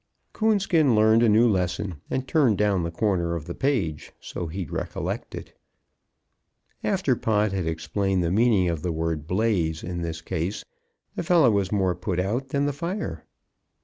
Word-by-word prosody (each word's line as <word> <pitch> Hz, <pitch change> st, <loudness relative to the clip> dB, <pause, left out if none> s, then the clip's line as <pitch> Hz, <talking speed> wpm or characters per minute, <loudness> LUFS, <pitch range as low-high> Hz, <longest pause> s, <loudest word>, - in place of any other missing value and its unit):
Coonskin 195 Hz, -, +2 dB
learned 110 Hz, +1 st, +5 dB
a 120 Hz, -, +4 dB
new 110 Hz, +3 st, +5 dB
lesson, 95 Hz, -2 st, -1 dB
and 130 Hz, 0 st, -2 dB
turned 130 Hz, -, +3 dB
down 100 Hz, -3 st, +2 dB
the 85 Hz, -, -2 dB
corner 85 Hz, -2 st, 0 dB
of 80 Hz, -3 st, -5 dB
the 85 Hz, -, -5 dB
page 100 Hz, -, -1 dB
so 85 Hz, -, -6 dB
he'd 85 Hz, -1 st, -5 dB
recollect -, -, -4 dB
it. -, -, -9 dB, 1.3 s
After -, -, +1 dB
Pod 105 Hz, -2 st, +1 dB
had 95 Hz, -4 st, -2 dB
explained 95 Hz, +3 st, -1 dB
the 85 Hz, -, 0 dB
meaning 105 Hz, -3 st, +3 dB
of 85 Hz, -3 st, -2 dB
the 90 Hz, -, -2 dB
word 80 Hz, -1 st, -2 dB
"blaze" 90 Hz, -5 st, 0 dB
in 85 Hz, 0 st, -4 dB
this 80 Hz, -1 st, -4 dB
case, 85 Hz, +7 st, -3 dB, 0.5 s
the -, -, -2 dB
fellow 170 Hz, -, +4 dB
was 100 Hz, -2 st, 0 dB
more 95 Hz, -3 st, +1 dB
put 90 Hz, +1 st, -3 dB
out 120 Hz, +9 st, -1 dB
than 140 Hz, +1 st, 0 dB
the 145 Hz, -, 0 dB
fire. 160 Hz, -, -4 dB
95 Hz, 170 wpm, -25 LUFS, 85-115 Hz, 1.3 s, learned